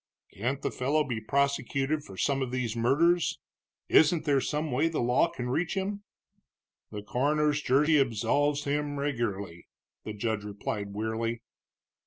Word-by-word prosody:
"Can't 125 +7 -3
the - - -1
fellow 145 +4 +1
be 120 -6 -4
prosecuted 140 +3 0
for 95 -7 -12
some 140 +4 +1
of 130 - -1
these 125 -3 -2
murders? 155 +9 +2 0.5
Isn't 160 +1 +4
there 140 -3 +3
some 150 +2 -2
way 145 +6 +2
the 165 - -2
law 125 +7 +3
can 130 -8 -5
reach 165 +7 -1
him?" 200 +1 -2 0.9
"The 105 -1 -7
coroner's 150 +6 +1
jury 150 +4 +3
absolves 140 +4 +1
him 145 0 -1
regularly," 105 -11 -3 0.4
the 110 - -5
judge 110 0 -2
replied 100 0 -5
wearily. 115 +2 -2
135 Hz, 145 wpm, -29 LUFS, 115-150 Hz, 0.9 s, Isn't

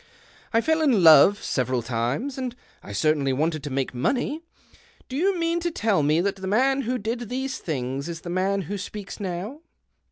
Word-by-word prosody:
I 230 - +3
fell 320 +4 +1
in 250 - +3
love 170 +6 +7
several 125 -2 -1
times, 125 - -2
and 250 -2 -4 0.3
I - - -10
certainly 140 +5 +1
wanted 155 +3 0
to 145 - -5
make 135 -1 -2
money. 260 - -1 0.7
Do 260 - -7
you 370 +6 +1
mean 335 0 0
to 345 0 -1
tell 215 - +1
me 150 +3 +2
that 195 +1 -1
the 190 0 -6
man 265 +7 +2
who 250 0 -1
did 230 +1 -4
these 265 +1 -3
things 135 -1 -3
is 165 -1 -6
the 175 - -7
man 195 +2 0
who 200 +5 -5
speaks 200 +1 -7
now 195 - -4
195 Hz, 190 wpm, -25 LUFS, -, 0.7 s, love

